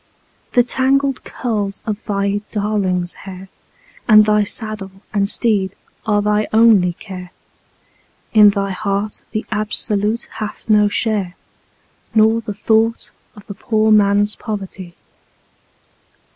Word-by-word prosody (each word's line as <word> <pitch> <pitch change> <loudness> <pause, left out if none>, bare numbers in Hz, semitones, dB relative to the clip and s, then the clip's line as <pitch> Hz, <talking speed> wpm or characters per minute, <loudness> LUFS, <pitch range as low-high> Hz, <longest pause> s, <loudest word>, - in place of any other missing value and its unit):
The 245 - +5
tangled 270 +2 +1
curls 205 -5 -3
of 215 -1 -4
thy 200 0 -1
darling's 195 -4 -1 0.2
hair, 190 0 -10 0.6
and 215 -1 +8
thy 210 0 +3
saddle 215 -1 -3 0.2
and 200 -1 +1
teed 205 -5 +1 0.3
are 205 -1 +2
thy 210 0 +1
only 220 -6 +5
care; 180 -1 -9 1.0
In 210 -2 +8
thy 200 -1 -1
heart 200 +2 -3
the 215 - -4
Absolute 210 +1 -1
hath 215 -1 -6
no 210 -1 +4
share, 205 -4 -1 0.8
nor 220 +1 +4
the 220 - -6
thought 225 +2 +1 0.2
of 205 -2 -14
the 200 - -7
poor 220 +2 0
man's 205 0 +3
poverty. 190 -5 -7
210 Hz, 115 wpm, -18 LUFS, 200-220 Hz, 1.0 s, and